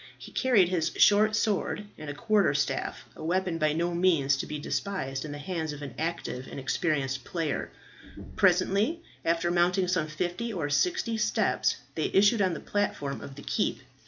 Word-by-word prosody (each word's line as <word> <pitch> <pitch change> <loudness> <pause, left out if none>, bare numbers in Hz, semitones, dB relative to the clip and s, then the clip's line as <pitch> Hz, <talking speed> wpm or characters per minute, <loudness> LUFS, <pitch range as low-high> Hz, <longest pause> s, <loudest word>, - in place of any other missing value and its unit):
He - - -11
carried 220 -9 +3
his 175 -3 +1
short 215 +1 +5
sword 210 -1 0
and 155 -1 -8
a 145 - -5
quarterstaff, 185 -7 0
a - - -9
weapon 175 0 0
by 155 -1 +3
no 170 +2 0
means 165 -6 +3
to - - -4
be 150 - -4
despised 145 -4 -3
in 150 - -6
the 145 - -5
hands 160 -1 -3
of 145 0 -8
an 140 -4 -7
active 155 -5 -3
and - - -7
experienced 135 -1 -1
player. 165 -2 -2 0.7
Presently, 200 - +2 0.2
after 170 +1 +1
mounting 180 +2 +2
some 175 -4 +1
fifty 175 +9 -3
or 160 -8 -3
sixty 230 - +1
steps, 215 - +1 0.2
they - - -1
issued 205 +3 +5
on 185 -3 +2
the - - -5
platform 145 -9 -2
of 135 - -9
the 145 - -10
keep. - - -1
175 Hz, 175 wpm, -28 LUFS, 150-200 Hz, 0.7 s, short